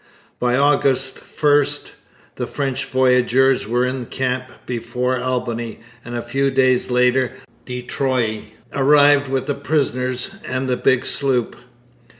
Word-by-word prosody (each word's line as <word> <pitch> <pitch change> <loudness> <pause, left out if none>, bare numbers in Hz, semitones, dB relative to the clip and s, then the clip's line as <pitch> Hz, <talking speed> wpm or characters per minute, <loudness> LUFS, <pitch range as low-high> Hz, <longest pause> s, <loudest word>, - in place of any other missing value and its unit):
By 125 0 +1
August 135 -2 +2 0.2
1 145 -1 +4 0.7
the - - -4
French 135 -2 -3
voyageurs 130 -1 +2
were 120 +2 +1
in 130 -1 -3
camp 130 -1 -2 0.2
before 125 +1 -2
Albany, 120 -3 -3 0.2
and 120 0 -7
a 120 - -3
few 135 +3 0
days 130 -2 +2
later 125 +1 +2 0.3
de 125 -1 -5
Troyes 125 -5 -1 0.3
arrived 145 +1 +4
with 135 -1 -1
the 145 - -1
prisoners 130 -1 -1
and 130 +1 -3
the 125 - +1
big 125 0 +1
sloop. 130 -4 +1
130 Hz, 130 wpm, -20 LUFS, 125-135 Hz, 0.7 s, 1